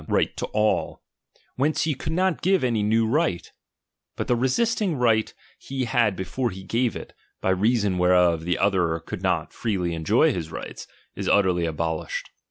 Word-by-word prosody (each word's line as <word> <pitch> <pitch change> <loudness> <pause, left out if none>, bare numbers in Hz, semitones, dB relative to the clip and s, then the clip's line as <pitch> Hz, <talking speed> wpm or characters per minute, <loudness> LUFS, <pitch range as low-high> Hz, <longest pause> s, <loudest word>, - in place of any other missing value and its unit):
right - - +1
to - - -3
all; 105 0 0 0.5
whence 145 +4 +1
he 160 - +1
could 155 +4 -4
Dot 185 -1 +1
give 190 -2 +2
any 115 -4 +1
new 110 +2 +2
right; 115 - 0 0.7
bnt - - -2
the 125 - +2
reststicg 180 - +1
right 110 -3 +2 0.3
he 135 -1 -3
had 115 -4 +2
before 120 +7 -2
he 95 -2 -9
gave 115 +4 0
it, - - -8 0.3
by 95 - 0
reason 100 -1 +1
whereof 90 -2 +3
the 90 +1 0
other 90 -5 +1
could - - -7
not - - -1
freely 95 -7 -2
en 80 -1 -5
joy - - +3
his 80 -3 -4
rights, - - -7 0.3
is - - -3
utterly 90 -4 +3
abolished. 80 0 -3
105 Hz, 175 wpm, -24 LUFS, 90-125 Hz, 0.7 s, whereof